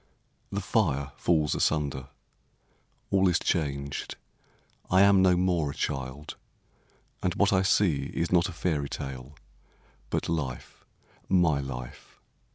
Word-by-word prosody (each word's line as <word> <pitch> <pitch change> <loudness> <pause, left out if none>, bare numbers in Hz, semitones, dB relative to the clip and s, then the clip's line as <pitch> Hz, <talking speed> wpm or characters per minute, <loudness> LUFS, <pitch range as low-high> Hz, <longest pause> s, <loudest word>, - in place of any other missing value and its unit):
The 100 - -2
fire 75 - 0
falls 80 -3 +1
asunder, 70 -3 0 1.0
all 95 -1 +4
is 85 - +3
changed, 70 -3 -2 0.7
I 95 +2 +5
am 100 -1 +6
no 90 -1 +4
more 90 -5 +1
a - - -6
child, 65 +3 -4 0.8
and 90 - -1
what 100 0 +3
I 95 - +4
see 90 -7 +2
Is 85 - -2
not 90 +1 +3
a - - -5
fairy 80 -4 -2
tale, 65 0 -7 0.7
but - - -1
life, 75 -7 -4 0.5
my 85 -6 +3
life. 65 -3 -8
80 Hz, 125 wpm, -28 LUFS, 70-90 Hz, 1.0 s, am